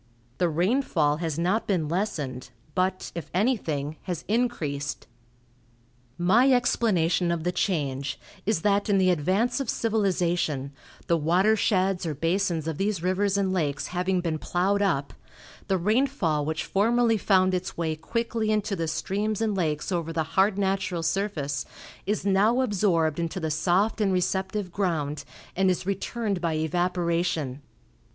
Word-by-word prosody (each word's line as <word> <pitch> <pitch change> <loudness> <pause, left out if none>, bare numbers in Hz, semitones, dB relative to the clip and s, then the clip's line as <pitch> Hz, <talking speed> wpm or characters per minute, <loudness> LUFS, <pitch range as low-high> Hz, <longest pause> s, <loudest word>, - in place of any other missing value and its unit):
The 175 - +3
rainfall 170 - +1
has 160 -2 -3
not 185 +7 0
been 175 -7 +1
lessened, 150 - -3 0.2
but, 185 0 -1
if 170 - -6
anything, 160 - 0
has 180 -4 -4
increased. 150 - -1 1.1
My 220 +10 +4
explanation 185 -9 +2
of 170 -2 -2
the 180 - 0
change 140 -8 -1 0.2
is, 205 -5 0
that 205 0 +2
in 200 - +4
the 185 -1 +4
advance 190 - +1
of 275 - -3
civilization, 175 - 0 0.3
the 170 - +2
water 180 +8 +3
sheds 190 -3 +1
or 155 - -2
basins 165 +1 0
of 160 -2 -3
these 195 -3 -1
rivers 195 +2 +1
and 190 -2 +1
lakes 150 -6 -1
having 180 0 0
been 165 -3 -2
plowed 195 +5 0
up, 140 -8 0 0.5
the 190 -1 +2
rainfall 200 - +1
which 160 +1 -2
formerly 230 +3 +2
found 185 -2 +3
its 185 0 -3
way 160 -2 -1
quickly 225 +6 -2
into 210 -1 0
the 165 -3 -2
streams 200 +6 -1
and 220 -2 0
lakes 155 -2 -1
over 170 -2 -1
the 160 -1 0
hard 195 +1 +3
natural 190 -3 -1
surface 160 -7 -1 0.4
is 210 -1 -1
now 205 +6 +3
absorbed 180 - +1
into 170 +2 -2
the 160 -2 -2
soft 185 +8 +1
and 200 -2 +2
receptive 190 +1 -1
ground, 155 -6 -1 0.3
and 190 +1 +3
is 180 0 -1
returned 200 0 -2
by 165 -2 0
evaporation. 170 -3 -1
185 Hz, 145 wpm, -26 LUFS, 160-205 Hz, 1.1 s, My